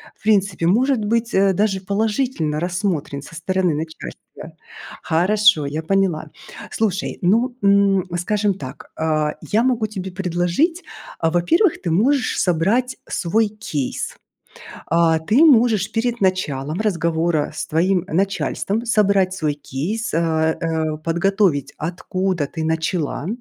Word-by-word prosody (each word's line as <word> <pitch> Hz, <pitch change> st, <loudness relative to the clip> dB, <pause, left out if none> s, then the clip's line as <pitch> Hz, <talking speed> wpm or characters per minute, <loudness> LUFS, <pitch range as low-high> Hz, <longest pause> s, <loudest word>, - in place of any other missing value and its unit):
в -, -, -31 dB
принципе 195 Hz, -5 st, +2 dB
может 250 Hz, +7 st, +3 dB
быть, 230 Hz, +2 st, 0 dB
э, 195 Hz, 0 st, +3 dB
даже 195 Hz, -1 st, 0 dB
положительно 205 Hz, -, -1 dB
рассмотрен 175 Hz, -5 st, -2 dB
со 165 Hz, -, -12 dB
стороны 185 Hz, +1 st, 0 dB
начальства. 160 Hz, +1 st, -8 dB, 0.5 s
Хорошо, 180 Hz, 0 st, +3 dB
я 150 Hz, +3 st, -3 dB
поняла. 180 Hz, -2 st, 0 dB, 0.4 s
Слушай, 205 Hz, -4 st, -1 dB
ну, 230 Hz, +8 st, +2 dB
м, 200 Hz, -1 st, +4 dB
скажем 205 Hz, +3 st, 0 dB
так, 135 Hz, -7 st, -10 dB
а, 155 Hz, -1 st, 0 dB
я 220 Hz, +3 st, +1 dB
могу 240 Hz, -4 st, +1 dB
тебе 190 Hz, -3 st, -6 dB
предложить, 185 Hz, -, 0 dB, 0.4 s
а, 165 Hz, -, +2 dB
во-первых, 320 Hz, -, +2 dB
ты 175 Hz, -, -2 dB
можешь 250 Hz, -, +2 dB
собрать 205 Hz, +10 st, +1 dB
свой 215 Hz, +5 st, +1 dB
кейс. 180 Hz, -11 st, -4 dB, 0.7 s
А, 165 Hz, -1 st, +3 dB
ты 215 Hz, -, +3 dB
можешь 225 Hz, -, +4 dB
перед 235 Hz, +1 st, -1 dB
началом 155 Hz, -4 st, -1 dB
разговора 170 Hz, -6 st, 0 dB
с 155 Hz, -, -4 dB
твоим 180 Hz, +3 st, +1 dB
начальством 195 Hz, +4 st, -1 dB
собрать 200 Hz, -5 st, +2 dB
свой 155 Hz, -5 st, -1 dB
кейс, 160 Hz, -, -4 dB
а 160 Hz, -1 st, +1 dB
а, 160 Hz, -2 st, -1 dB
подготовить 170 Hz, -3 st, 0 dB
откуда 180 Hz, 0 st, -2 dB
ты 160 Hz, 0 st, -5 dB
начала, 160 Hz, -1 st, -2 dB
185 Hz, 125 wpm, -20 LUFS, 160-210 Hz, 0.7 s, м